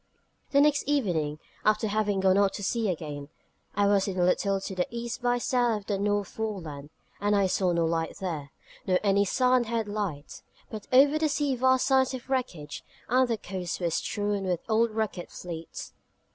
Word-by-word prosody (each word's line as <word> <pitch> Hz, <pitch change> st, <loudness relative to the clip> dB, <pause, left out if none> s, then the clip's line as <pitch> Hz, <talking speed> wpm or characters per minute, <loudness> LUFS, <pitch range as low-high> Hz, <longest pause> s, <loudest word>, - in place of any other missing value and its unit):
The 280 Hz, -, +4 dB
next 295 Hz, 0 st, +3 dB
evening, 170 Hz, -, 0 dB, 0.3 s
after 215 Hz, +1 st, +2 dB
having 205 Hz, -2 st, 0 dB
gone 190 Hz, 0 st, +4 dB
out 200 Hz, -1 st, +3 dB
to 205 Hz, -, -6 dB
sea 225 Hz, +1 st, 0 dB
again, 150 Hz, -4 st, -5 dB, 0.5 s
I 205 Hz, 0 st, +3 dB
was 200 Hz, -1 st, +3 dB
in 190 Hz, -1 st, -3 dB
a 180 Hz, -, +2 dB
little 195 Hz, +2 st, +2 dB
to 195 Hz, -, -6 dB
the 180 Hz, -, 0 dB
E. 235 Hz, 0 st, -5 dB
by 245 Hz, 0 st, +2 dB
S. 245 Hz, -, -3 dB
of 235 Hz, -5 st, +2 dB
the 200 Hz, -2 st, -1 dB
North 205 Hz, 0 st, 0 dB
Foreland: 165 Hz, -10 st, -5 dB, 0.3 s
and 205 Hz, 0 st, +2 dB
I 200 Hz, -1 st, +3 dB
saw 185 Hz, -1 st, +1 dB
no 170 Hz, -1 st, +1 dB
light 165 Hz, 0 st, -1 dB
there, 160 Hz, -7 st, -4 dB, 0.4 s
nor 185 Hz, -1 st, +4 dB
any 200 Hz, 0 st, +3 dB
Sandhead 235 Hz, -1 st, +2 dB
light; 200 Hz, -9 st, -4 dB, 0.3 s
but 215 Hz, -2 st, -7 dB
over 280 Hz, +4 st, +6 dB
the 310 Hz, -1 st, +2 dB
sea 290 Hz, -2 st, 0 dB
vast 260 Hz, +1 st, +3 dB
signs 265 Hz, -1 st, +3 dB
of 255 Hz, +1 st, -9 dB
wreckage, 175 Hz, -, -3 dB, 0.3 s
and 255 Hz, +2 st, +4 dB
the 230 Hz, -2 st, 0 dB
coasts 185 Hz, -3 st, -5 dB
were 170 Hz, -2 st, 0 dB
strewn 205 Hz, +3 st, -1 dB
with 180 Hz, -2 st, -1 dB
old 225 Hz, +1 st, +3 dB
wrecked 215 Hz, -5 st, -3 dB
fleets. 165 Hz, -2 st, -8 dB
205 Hz, 185 wpm, -28 LUFS, 180-235 Hz, 0.5 s, over